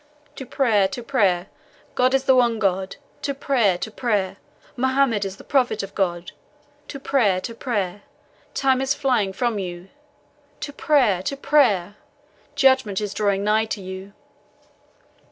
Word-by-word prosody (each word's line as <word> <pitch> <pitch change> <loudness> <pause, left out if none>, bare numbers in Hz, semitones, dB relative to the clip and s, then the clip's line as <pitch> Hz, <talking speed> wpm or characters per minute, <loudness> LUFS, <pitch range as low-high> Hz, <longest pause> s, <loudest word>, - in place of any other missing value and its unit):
"To 265 - -7
prayer 220 -9 +2
to 240 +5 -7
prayer! 195 -9 +1 0.5
God 255 +1 +2
is 265 - +1
the 265 -1 +4
one 240 -2 +3
God. 190 -2 -1 0.3
To 280 -1 -2
prayer 235 -10 +1
to 220 - -5
prayer! 205 -5 -1 0.4
Mohammed 260 -5 +1
is 195 0 -6
the - - -13
Prophet 260 -6 +1
of 195 - -8
God. 175 -3 -2 0.6
To 275 - -7
prayer 225 -9 +2
to 230 - -6
prayer! 205 -5 -3 0.5
Time 265 -1 +2
is 270 +1 0
flying 245 -9 +1
from 225 +2 -1
you. 180 0 -6 0.7
To 285 - -5
prayer 255 -13 +2
to 275 +9 -3
prayer! 210 -10 +2 0.6
Judgment 260 -7 +3
is 205 -1 -4
drawing 200 -2 0
nigh 215 +1 +2
to 215 - -4
you." 190 +2 -8
215 Hz, 150 wpm, -22 LUFS, 195-260 Hz, 0.7 s, the